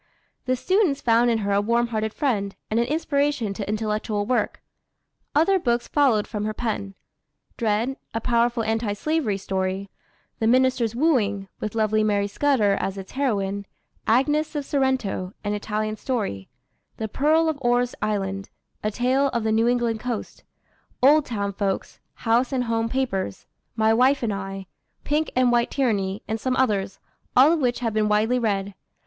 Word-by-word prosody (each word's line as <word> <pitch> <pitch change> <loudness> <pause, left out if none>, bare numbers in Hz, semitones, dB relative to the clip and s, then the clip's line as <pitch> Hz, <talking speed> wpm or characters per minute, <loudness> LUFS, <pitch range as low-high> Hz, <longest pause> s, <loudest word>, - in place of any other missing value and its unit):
The 255 0 +1
students 360 - +1
found 235 +1 +3
in 230 - +2
her 200 - 0
a 200 0 +3
warm 235 +2 +1
hearted 220 -1 -1
friend, 210 -8 -1 0.2
and 220 - +2
an 235 - +1
inspiration 285 -7 0
to 200 0 -5
intellectual 215 -1 -1
work. 250 +3 0 0.8
Other 375 +6 +4
books 240 -5 0
followed 255 -8 +3
from 210 -2 -4
her 215 0 -3
pen: 205 -4 -3 0.6
Dred, 230 +3 0 0.2
a 225 - -2
powerful 235 0 +1
anti 220 -1 0
slavery 265 -3 -1
story; 190 0 -3 0.5
The 220 - +1
Minister's 255 -2 +2
Wooing, 210 -9 +1
with 215 - -4
lovely 215 -1 +2
Mary 205 -1 +1
Scudder 215 -2 +2
as 195 0 -3
its 190 -1 -8
heroine; 200 -7 -1 0.4
Agnes 295 +7 +2
of 290 -1 -2
Sorrento, 260 -10 -1
an 205 0 -1
Italian 215 +1 -2
story; 200 - -3 0.5
the 220 - -3
Pearl 310 +8 +2
of 315 -3 -1
Orr's 245 0 +2
Island, 195 -2 -2 0.3
a 215 - +1
tale 255 +5 +1
of 235 -4 -2
the 220 - +1
New 225 +1 +3
England 240 -2 +1
coast; 240 -2 -5 0.6
Old 295 +2 +6
Town 200 -4 -2
Folks; 195 -1 -3 0.2
House 235 +3 +1
and 260 -2 0
Home 230 -1 -1
Papers; 210 - -2 0.3
My 220 0 +3
Wife 255 +3 +3
and 215 -3 0
I; 195 0 -5 0.4
Pink 305 +2 0
and 255 -1 +4
White 240 0 +2
Tyranny; 205 -6 -1
and 220 0 -2
some 255 +3 -1
others, 205 -7 0 0.4
all 270 +5 +7
of 335 - +2
which 245 -3 0
have 230 -3 -1
been 215 -1 +1
widely 220 +4 +2
read. 200 -3 -1
225 Hz, 165 wpm, -24 LUFS, 205-255 Hz, 0.8 s, all